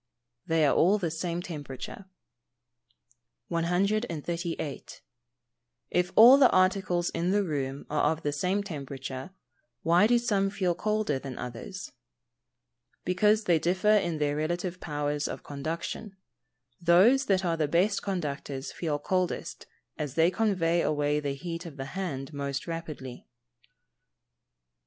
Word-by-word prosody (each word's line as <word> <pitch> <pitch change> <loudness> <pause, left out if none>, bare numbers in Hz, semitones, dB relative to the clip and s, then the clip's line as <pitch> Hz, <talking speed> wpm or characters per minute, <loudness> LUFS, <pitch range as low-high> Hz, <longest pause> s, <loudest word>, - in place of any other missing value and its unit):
_ - - -37
They 160 -1 +3
are 140 - +4
all 185 +5 +4
of 210 - -3
the 170 -3 -1
same 170 +1 -3
temperature. 150 +3 -7 1.4
138. 170 - -2 0.9
If 180 0 +1
all 245 +5 +9
the 260 - +7
articles 185 -2 +2
in 175 +2 -1
the 205 +1 +2
room 140 -5 -3
are 150 0 +2
of 160 0 -4
the 145 - 0
same 185 +7 0
temperature, 140 -4 -6 0.5
why 175 +5 +5
do 240 +1 +4
some 205 -5 +1
feel 190 -3 0
colder 210 -6 -1
than 135 -2 -7
others? 125 +11 -7 1.1
Because 210 +4 +3
they 170 -5 +3
differ 185 +5 +1
in 175 -6 +1
their 145 -1 0
relative 175 +3 -2
powers 145 -2 -2
of - - -6
conduction. 165 +8 -5 0.7
Those 195 +11 +5
that 190 -1 +2
are 170 -1 +1
the 155 -2 0
best 185 +7 +2
conductors 145 -7 -4
feel 155 -4 -2
coldest, 185 +4 -2 0.3
as 145 -3 -4
they 165 +2 +4
convey 180 -6 +1
away 150 -1 +1
the 140 -2 -3
heat 170 +4 -6
of 150 -4 -11
the 135 - -4
hand 150 -7 -4
most 140 -1 -3
rapidly. 155 -7 -7
170 Hz, 135 wpm, -28 LUFS, 145-190 Hz, 1.4 s, all